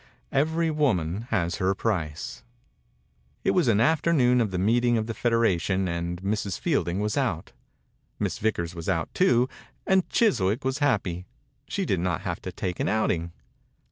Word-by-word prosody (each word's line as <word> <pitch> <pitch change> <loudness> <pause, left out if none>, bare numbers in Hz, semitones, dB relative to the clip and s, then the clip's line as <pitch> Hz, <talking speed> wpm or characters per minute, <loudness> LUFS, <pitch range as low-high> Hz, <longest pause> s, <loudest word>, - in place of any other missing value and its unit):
Every 160 +4 +1
woman 110 - 0
has 85 -7 0
her 95 0 +1
price. 75 - -3 1.0
It - - +3
was 180 -7 +2
an 110 -3 +4
afternoon 135 -2 +3
of 110 - +1
the 95 - -3
meeting 120 +5 +2
of 110 - -1
the 115 - -4
federation 95 -6 +1
and 85 0 -3
Mrs. 100 -1 -2
Fielding 90 +3 0
was 105 +5 -1
out. 105 - -1 0.7
Miss - - -2
Vickers 85 -6 -1
was 85 0 -5
out, 85 -4 -1
too, 125 -10 +3 0.4
and 190 -1 +2
Chis 225 - +3
wick 100 +8 0
was 130 +2 0
happy. 95 - 0 0.4
She - - -2
did - - 0
not 85 -3 -1
have - - -4
to - - -5
take 90 -2 -4
an - - 0
outing. 85 -6 0
105 Hz, 165 wpm, -26 LUFS, 85-125 Hz, 1.0 s, an